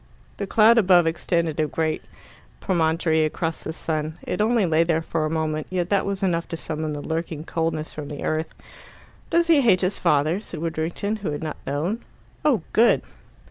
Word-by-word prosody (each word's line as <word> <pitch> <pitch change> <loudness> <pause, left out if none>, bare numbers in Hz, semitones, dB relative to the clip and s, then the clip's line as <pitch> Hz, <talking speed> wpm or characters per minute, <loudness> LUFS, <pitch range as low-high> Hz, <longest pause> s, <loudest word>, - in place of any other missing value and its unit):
The 200 - -3
cloud 225 +3 +6
above 180 -4 +5
extended 165 -1 0
a 155 - +2
great 155 +1 -1 0.6
promontory 160 -3 +1
across 160 +1 -2
the - - -4
sun. 155 0 -3
It - - -2
only 225 -1 +3
lay 165 -1 +3
there 165 -1 0
for 160 -1 -1
a - - -3
moment, 155 -1 -2
yet 180 0 -2
that 200 -1 +2
was 200 -1 -3
enough 170 -3 0
to 165 - -5
summon 155 -1 -4
the 145 - -5
lurking 160 -1 -3
coldness 160 -1 -2
from 150 -2 -6
the 145 0 -6
earth. 155 +1 -1 0.8
"Does 340 0 +3
he 325 -4 +5
hate 220 -8 +4
his 185 +1 0
father?" 150 +5 +2
said 185 -6 -8
Widdrington, 170 +6 -2
who 200 -5 -4
had 145 +1 -4
not 155 -1 -4
known. 165 +11 -2 0.4
"Oh, 250 - +2
good!" 235 +2 +4
165 Hz, 185 wpm, -24 LUFS, 155-190 Hz, 0.8 s, cloud